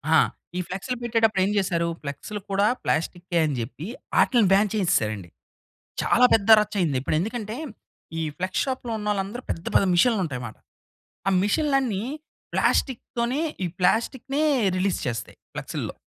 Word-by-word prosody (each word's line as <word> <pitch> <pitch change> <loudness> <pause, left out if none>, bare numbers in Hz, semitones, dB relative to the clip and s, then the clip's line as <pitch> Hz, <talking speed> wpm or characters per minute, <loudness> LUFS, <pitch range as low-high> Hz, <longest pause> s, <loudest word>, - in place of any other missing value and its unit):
ఆ! - - +8 0.4
ఈ - - 0
ఫ్లెక్స్‌లు 215 +7 -4
పెట్టేటప్పుడు 225 -4 +2
ఏం 205 - 0
జెసారు? 170 -3 +1
ఫ్లెక్స్‌లు 150 +9 -6
కూడా 200 +1 +3 0.2
ప్లాస్టికే 175 +2 -1
అని 145 -3 -1
జెప్పి, 140 - -5 0.3
అటిల్ని 230 -7 +4
బాన్ 205 +1 +4
చేసేసారండి. 110 - 0 0.7
చాలా 250 - +5
పెద్ద 220 -1 +2
రచ్చ 210 0 -4
అయింది. 150 -7 +1
ఇప్పుడు 145 - -1
ఎందుకంటే, 220 +2 -3 0.6
ఈ - - -1 0.2
ఫ్లెక్స్ 185 +1 -1
షాప్‌లో 260 -3 -3
ఉన్నోళ్ళందరూ 210 +3 -2
పెద్ద, 165 - -6
పెద్ద 195 - +5
మిషన్లుంటాయిమాట. 170 - +1 0.7
ఆ 195 - +4
మిషన్‌లన్నీ 260 -3 +1 0.5
ప్లాస్టిక్‌తోనే, 245 +1 0 0.2
ఈ - - 0
ప్లాస్టిక్‌నె 235 +9 +1 0.4
రిలీజ్ 185 0 0
చేస్తాయి 115 -2 -4 0.2
ఫ్లెక్స్‌లో. - - -5
200 Hz, 130 wpm, -25 LUFS, 170-230 Hz, 0.7 s, ఆ